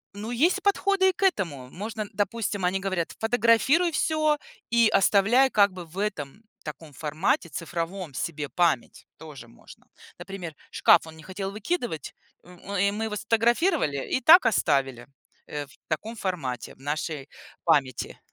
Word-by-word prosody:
Ну, 210 +2 -6
есть 335 +11 +2
и - - -26
подходы 395 -1 +3
и - - +3
к 390 - -5
этому. 165 - 0
Можно, 215 +3 -5
допустим, 205 -1 -1
они 185 +2 +1
говорят: 190 -4 -2
фотографируй 245 +9 +3
всё 310 -1 +1 0.3
и 235 -1 +4
оставляй 220 +7 +4
как 205 -3 +4
бы 180 -2 -8
в 165 +4 -15
этом, 205 -2 -4 0.2
таком 150 0 -9
формате 155 +4 -1
цифровом 170 +1 -5
себе 150 +2 -3
память. 170 -8 0
Тоже 150 -7 -11
можно. 115 - -17 0.3
Например, 185 -5 -7 0.2
шкаф 165 - +4
он 160 0 -12
не 160 - -13
хотел 195 +2 -5
выкидывать, 220 - -3 0.3
у 175 - -18 0.3
и 200 +1 +2
мы 215 +2 -3
его 215 -1 -4
сфотографировали, 230 - +1
и 260 - +1
так 350 +4 +8
оставили, 135 - +1 0.4
э, 145 -1 -5
в 140 - -20
таком 215 +9 -3
формате 150 - -4
в - - -29
нашей 145 0 -4 0.4
памяти. 140 -7 +1
195 Hz, 155 wpm, -26 LUFS, 155-230 Hz, 0.4 s, так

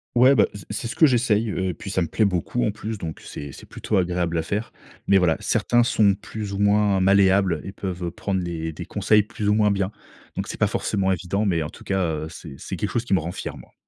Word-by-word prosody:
Ouais, 130 +3 +6
bah, - - +5
s 100 -4 -10
c'est 115 - -3
ce - - -6
que 160 - +6
j'essaye, 115 -3 +2
heu, 95 -1 -1
et - - -2
puis 100 +5 -8
ça 95 -2 +1
me 85 - -3
plaît 110 - +1
beaucoup 100 +5 0
en - - +2
plus, 110 0 -6
donc 80 -2 -6
c'est 70 -1 -8
c'est - - -12
plutôt 105 - -2
agréable 90 -2 0
à 80 - 0
faire, 105 +6 -3 0.4
mais 100 - +6
voilà, 85 -4 +3
certains 120 0 +2
sont 105 -4 +3
plus 105 +1 -6
ou 100 - -3
moins 100 -1 +3
malléables 95 -3 +4
et 95 - -6
peuvent 90 -3 -4
prendre 95 +2 -2
les 80 -2 -4
des 85 +2 -7
conseils 105 +2 +3
plus 105 -1 -3
ou 105 - +4
moins 105 -1 +3
bien. 95 0 -1 0.4
Donc, - - -3
c'est - - -6
pas - - +4
forcément 95 -1 0
évident, 95 +4 -1
mais 85 -5 +1
en 75 - -5
tout - - -14
cas, 95 -1 0 0.2
heu, - - -7
c'est 80 -3 -10
c'est - - -5
quelque - - -3
chose 120 0 -1
qui 100 - +2
me - - +3
rend 85 +3 -4
fier, - - -6
moi. - - -15
100 Hz, 260 wpm, -23 LUFS, 90-105 Hz, 0.4 s, Ouais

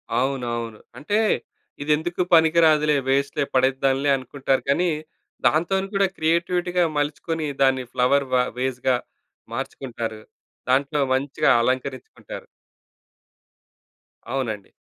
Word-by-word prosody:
అవునవును. 120 -4 -2 0.2
అంటే 205 +9 0 0.6
ఇది 145 +1 -1
ఎందుకు 175 +3 -3
పనికిరాదులే 160 -2 +5
వేస్ట్‌లే 140 +1 +1
పడేద్దాంలే 135 +2 +2
అనుకుంటారు 135 +1 -1
కానీ 175 +6 +2 0.6
దాంతోని 190 +5 +1
కూడా 195 0 +3
క్రియేటివిటీ‌గా 175 +2 +1
మలుచుకొని, 155 +2 -2
దాన్ని 130 -1 +3
ఫ్లవర్ 140 +3 +3
వ - - +5 0.2
వేస్‌గా 130 0 0 0.6
మార్చుకుంటారు. 115 -4 -5 0.5
దాంట్లో 140 +3 +2
మంచిగా 135 +2 +1
అలంకరిచ్చుకుంటారు. 130 +1 -4 1.9
అవునండి. 110 -7 -3
140 Hz, 90 wpm, -23 LUFS, 130-160 Hz, 1.9 s, పనికిరాదులే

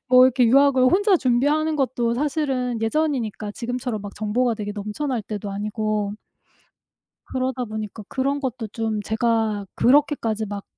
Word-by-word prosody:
뭐 255 0 +8
이렇게 255 -1 +4
유학을 275 +2 +5
혼자 390 - +4
준비하는 295 +4 +1
것도 250 -4 0
사실은 265 -4 -1
예전이니까 225 -4 -1
지금처럼 245 0 -4
막 200 0 -8
정보가 230 +3 0
되게 210 -2 -5
넘쳐날 215 +5 -3
때도 205 -1 -5
아니고 210 0 -2 1.1
그러다 255 -1 -2
보니까 215 -1 -6
그런 275 +2 -1
것도 255 -4 -4
좀 220 -1 -2
제가 220 -1 0
그렇게까지 245 -5 +2
막 200 0 -5
240 Hz, 335 characters per minute, -23 LUFS, 215-265 Hz, 1.1 s, 뭐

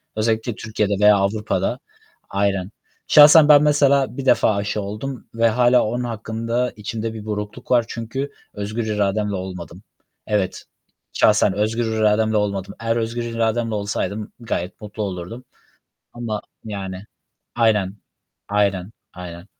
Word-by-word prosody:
Özellikle 110 +1 0
Türkiye'de 105 -2 -1
veya 105 0 +6
Avrupa'da, 105 +2 -1 0.5
aynen. 100 -1 0 0.4
Şahsen 150 +1 +8
ben 145 0 +8
mesela 140 -3 +3
1 135 - -4
defa 110 -5 +4
aşı 100 +1 -2
oldum 110 +6 -6
ve 115 0 +3
hâlâ 125 +2 +4
onun 120 +3 -2
hakkında 115 +2 -2
içimde 110 +1 -4
bir 110 -1 -8
burukluk 105 +2 -5
var 120 -2 +4
çünkü 120 +5 -4 0.2
özgür 105 +3 -3
irademle 105 -1 0
olmadım. 90 -1 -7 0.5
Evet, 105 -3 -1 0.5
şahsen 105 -2 +4
özgür 110 +3 0
irademle 110 0 +2
olmadım. 100 -2 -2
Eğer 115 0 0
özgür 115 +1 -2
irademle 115 -1 -1
olsaydım 100 +1 -3
gayet 100 -5 -4
mutlu 105 +1 -5
olurdum 100 +6 -6 0.7
ama, 115 -3 -4 0.2
yani 100 -2 -6 0.5
Aynen, 105 -4 +2 0.5
aynen, 100 -1 0 0.2
aynen. 90 0 -9
110 Hz, 125 wpm, -21 LUFS, 100-115 Hz, 0.7 s, Şahsen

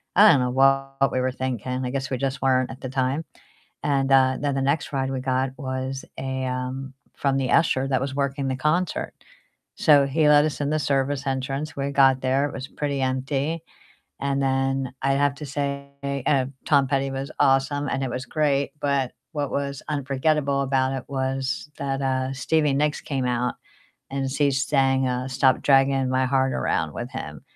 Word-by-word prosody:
I 210 +3 +8
don't 145 - +4
know 125 - 0
what 135 +1 +2
we 130 - 0
were 130 0 0
thinking, 130 0 -3
I - - -2
guess 135 0 -3
we 130 - -1
just 135 0 -2
weren't 130 -1 +2
at 130 - -11
the 130 - -5
time. 130 +4 -1 0.6
And, 135 -1 +1
uh, 130 -1 +4
then 145 -1 0
the 135 - 0
next 140 +3 0
ride 135 -1 -1
we 135 -1 -2
got 130 0 0
was 130 -1 -4
a, 130 0 -3
um 130 +1 -4 0.2
from 140 -1 +1
the 135 -2 0
usher 135 -5 +3
that 130 -2 +1
was 135 0 -3
working 140 0 -1
the 130 - -1
concert. 155 +6 -1 0.6
So 145 -2 +5
he 150 +2 +2
let 150 0 +6
us 155 -1 -3
in 145 - 0
the 155 - +1
service 140 0 0
entrance, 135 +3 -3
we 140 0 -2
got 135 -2 +4
there, 135 +2 +2
it - - -9
was 130 0 -6
pretty 140 -2 -3
empty, 135 +5 -1 0.6
and 140 0 0
then 135 -1 0
I'd 135 +1 +2
have 145 0 +2
to 150 - -7
say 140 0 -3 0.4
uh, 135 -3 +3 0.2
Tom 140 -3 +4
Petty 135 -1 0
was 135 +1 -4
awesome, 140 +1 +2
and 135 - -1
it 130 - -3
was 130 +1 -4
great, 140 -2 0
but 140 -3 0 0.2
what 145 -2 -2
was 140 -1 -3
unforgettable 140 0 0
about 135 -1 +1
it 130 -2 -4
was 135 +1 -2
that, 135 -1 -2
uh, 130 0 0
Stevie 150 +2 +1
Nicks 150 +1 +1
came 135 -3 -3
out, 125 0 0 0.6
and 135 0 -2
she 140 +1 +2
sang, 135 -1 +2
uh, 125 +1 -2
"Stop 130 0 +2
Dragging 135 -1 +3
My 130 0 +2
Heart 135 0 +1
Around" - - -1
with - - -5
him. - - -7
135 Hz, 190 wpm, -24 LUFS, 130-140 Hz, 0.6 s, I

